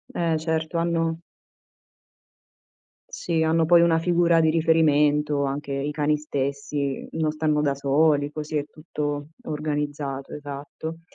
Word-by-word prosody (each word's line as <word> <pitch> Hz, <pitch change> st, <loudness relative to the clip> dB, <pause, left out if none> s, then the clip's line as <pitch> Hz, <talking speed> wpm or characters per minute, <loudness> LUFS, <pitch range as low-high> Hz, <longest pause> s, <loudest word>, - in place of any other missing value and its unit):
Eh, 165 Hz, -2 st, +1 dB
certo 160 Hz, +1 st, -2 dB
hanno 165 Hz, -1 st, 0 dB, 1.9 s
Sì, 165 Hz, -2 st, -1 dB
hanno 160 Hz, +1 st, +3 dB
poi 170 Hz, +1 st, +6 dB
una 170 Hz, -1 st, +4 dB
figura 170 Hz, 0 st, +3 dB
di 160 Hz, -1 st, +3 dB
riferimento, 150 Hz, -3 st, +3 dB
anche 140 Hz, 0 st, -3 dB
i 140 Hz, +2 st, -2 dB
cani 150 Hz, 0 st, +1 dB
stessi, 140 Hz, -1 st, -3 dB
non 155 Hz, -1 st, 0 dB
stanno 155 Hz, -1 st, 0 dB
da 145 Hz, -2 st, +1 dB
soli, 145 Hz, +1 st, +2 dB
così 155 Hz, 0 st, -4 dB
è 145 Hz, -, -2 dB
tutto 145 Hz, -2 st, -4 dB, 0.2 s
organizzato, 145 Hz, -2 st, -3 dB
esatto. 145 Hz, +3 st, -7 dB
150 Hz, 125 wpm, -24 LUFS, 145-160 Hz, 1.9 s, poi